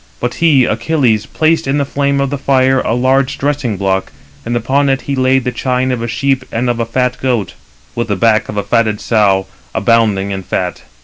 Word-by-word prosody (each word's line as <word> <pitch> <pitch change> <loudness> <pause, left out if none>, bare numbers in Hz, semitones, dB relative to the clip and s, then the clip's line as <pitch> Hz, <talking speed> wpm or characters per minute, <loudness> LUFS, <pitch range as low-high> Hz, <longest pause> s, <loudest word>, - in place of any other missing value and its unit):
But 120 0 -2
he 145 -7 +5
[Achilles] 115 -3 0
placed 160 -2 +1
in 135 +2 +1
the 140 - 0
flame 140 0 0
of 140 0 -1
the 145 - -2
fire 130 -1 +2
a 115 - -1
large 130 +2 +1
dressing 135 -7 -1
block, 95 0 -1 0.3
and 120 +1 -3
upon 135 +5 +1
it 135 0 +1
he 140 - -3
laid 130 0 +2
the 125 - -1
chine 125 +1 -1
of 125 -2 -2
a 115 - -3
sheep 135 +3 0
and 120 +2 0
of 120 - -4
a 115 - -1
fat 125 +1 -1
goat, 120 -7 -1 0.4
with 120 - -2
the 105 - 0
back 110 +2 +2
of 105 - -5
a 100 - 0
fatted 110 0 +1
sow, 100 -4 +2 0.3
abounding 105 -2 +2
in 95 -1 -3
fat. - - -3
125 Hz, 210 wpm, -15 LUFS, 110-135 Hz, 0.4 s, he